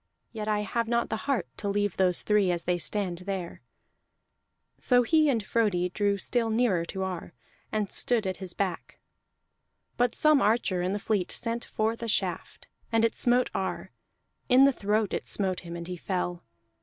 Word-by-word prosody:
Yet 215 -2 -5
I 210 -1 +1
have 230 +3 -2
not 235 0 0
the - - -1
heart 240 -11 +1
to 205 - -3
leave 205 -1 0
those 180 -2 +2
three 210 -3 +3
as 175 -1 -1
they 175 -1 0
stand 185 -2 0
there." 185 -2 -5 1.2
So 245 -1 +4
he 310 +3 +3
and 225 -6 0
Frodi 195 -6 +1
drew 200 +1 0
still 230 +3 -1
nearer 220 -7 +1
to 190 +3 -4
Ar, 180 -2 -5 0.4
and 210 -2 -1
stood 235 -4 +1
at 185 -1 -2
his 185 -3 -5
back. 190 -3 -3 1.0
But 245 0 +2
some 305 -2 +4
archer 210 -4 +2
in 180 +2 -1
the - - -1
fleet 200 -3 -1
sent 235 0 -2
forth 220 +2 -2
a 230 - -3
shaft, 215 - -2 0.2
and 225 0 +3
it 230 - +1
smote 245 +1 +2
Ar; 190 - -3 0.6
in 255 +1 +7
the 275 0 +5
throat 210 -1 0
it - - -3
smote 190 -3 0
him, 170 -1 -8
and 170 0 -6
he 180 0 -5
fell. 180 -1 -3
205 Hz, 180 wpm, -28 LUFS, 185-230 Hz, 1.2 s, in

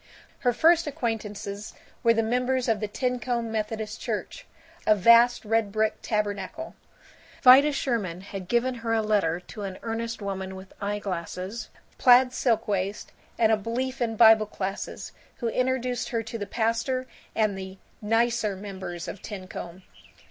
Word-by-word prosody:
III - - -26 0.3
Her 245 -1 +2
first 330 +5 +4
acquaintances 210 -7 -4 0.3
were 230 0 +4
the 225 - +2
members 250 +2 0
of 225 -2 +2
the 210 - -2
Tincomb 245 0 -2
Methodist 220 0 -3
Church, - - -4 0.4
a 215 - +6
vast 235 +4 +5
red 225 -1 +1
brick 215 +1 0
tabernacle. 210 - -3 0.7
Vida 270 +3 +8
Sherwin 225 -11 -2
had 195 -1 -7
given 240 +5 +1
her 230 -1 -1
a 220 - +1
letter 200 -6 +1
to 205 +4 -10
an 195 -2 -5
earnest 230 +1 -3
woman 190 -2 -4
with 190 0 -11
eye 205 +1 -1
glasses, 190 +3 -5 0.3
plaid 250 0 +6
silk 235 -3 +1
waist, 200 0 -2 0.3
and 220 -1 +4
a - - +6
belief 250 +5 -3
in 225 -2 0
Bible 220 -1 +7
Classes, 195 -1 -5 0.2
who 235 - -2
introduced 255 0 -1
her 230 -2 -1
to 225 +1 -6
the 205 - -4
Pastor 230 +3 0 0.3
and 215 -3 +2
the 190 0 -7 0.2
Nicer 225 -1 +1
Members 190 -3 -7
of 195 - -7
Tincomb. 185 -3 -8
220 Hz, 155 wpm, -26 LUFS, 200-240 Hz, 0.7 s, Vida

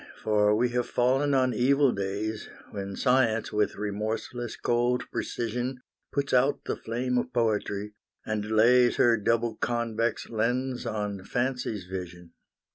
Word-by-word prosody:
for 105 -1 +3
we 120 +3 +2
have 120 0 -1
fallen 135 +3 +2
on 130 -1 +2
evil 140 +2 +3
days, 100 +2 -3 0.2
When 100 -1 -5
science, 125 -3 +2
with 105 0 +1
remorseless 110 +3 -3
cold 120 +1 +1
precision, 125 +2 -3 0.3
Puts 140 0 -1
out 130 +3 +2
the - - -1
flame 125 +2 -1
of 125 - -4
poetry, 105 -3 -1 0.3
and 105 -1 -2
lays 120 +3 +5
Her 120 -1 +5
double 115 +1 0
convex 120 -1 -1
lens 125 +3 -1
on 105 -3 -3
fancy's 125 -5 -2
vision. 90 -2 -7
115 Hz, 130 wpm, -27 LUFS, 105-125 Hz, 0.3 s, lays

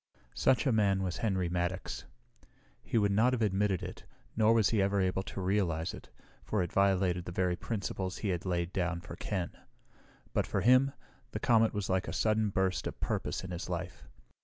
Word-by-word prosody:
Such 130 - +2
a 135 - +3
man 100 -3 +2
was 90 -2 -2
Henry 95 -5 0
Maddox. 90 +2 -2 0.8
He - - -1
would 100 -2 +3
not 115 +6 +3
have 120 -3 +1
admitted 100 -2 +1
it, - - -7 0.3
nor 110 0 +4
was 115 -3 +4
he 110 -3 +3
ever 100 +1 +2
able 95 0 +1
to 95 - -7
realize 90 -4 0
it, - - -11 0.3
for 105 -4 0
it 85 - -6
violated 95 -3 +2
the - - -5
very 90 0 +1
principles 95 0 -3
he 105 - -2
had 90 -2 -1
laid 90 -1 -1
down 90 -2 -1
for 85 0 -8
Ken. 90 -1 -3 0.8
But - - +1
for 100 - 0
him, 130 +5 +5 0.4
the - - -2
comet 115 -2 +4
was 105 -2 -2
like 95 0 0
a - - -4
sudden 110 -1 +2
burst 95 -1 0
of - - -7
purpose - - -2
in 90 - -6
his 85 - -5
life. - - -5
95 Hz, 195 wpm, -31 LUFS, 90-105 Hz, 0.8 s, him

